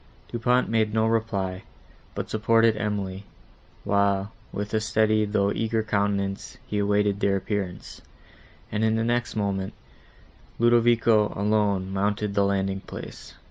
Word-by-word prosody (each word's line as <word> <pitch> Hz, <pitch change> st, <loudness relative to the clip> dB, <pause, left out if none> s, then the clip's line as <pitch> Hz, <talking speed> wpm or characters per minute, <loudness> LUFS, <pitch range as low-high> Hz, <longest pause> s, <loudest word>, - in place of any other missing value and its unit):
Du 120 Hz, -, -4 dB
Pont 125 Hz, +2 st, +2 dB
made 110 Hz, -1 st, +1 dB
no 110 Hz, 0 st, +3 dB
reply, 100 Hz, -5 st, -1 dB, 0.5 s
but -, -, -3 dB
supported 115 Hz, +1 st, +3 dB
Emily, 100 Hz, -2 st, -3 dB, 0.6 s
while, 100 Hz, 0 st, +1 dB, 0.2 s
with 105 Hz, +1 st, -5 dB
a 110 Hz, -, +3 dB
steady, 110 Hz, 0 st, +2 dB
though 100 Hz, -1 st, +1 dB
eager, 110 Hz, 0 st, -1 dB
countenance, 100 Hz, -2 st, -1 dB
he 105 Hz, -, -2 dB
awaited 100 Hz, 0 st, +1 dB
their 100 Hz, -1 st, +2 dB
appearance, 95 Hz, -2 st, -4 dB, 0.7 s
and, 105 Hz, +1 st, -1 dB
in 110 Hz, 0 st, +2 dB
the 115 Hz, -, 0 dB
next 120 Hz, +1 st, -1 dB
moment, 100 Hz, -2 st, -2 dB, 0.8 s
Ludovico, 115 Hz, -2 st, +4 dB
alone, 100 Hz, -2 st, +1 dB
mounted 105 Hz, +1 st, -1 dB
the 100 Hz, 0 st, +3 dB
landing 95 Hz, -1 st, 0 dB
place. -, -, -10 dB
105 Hz, 135 wpm, -25 LUFS, 100-110 Hz, 0.8 s, Ludovico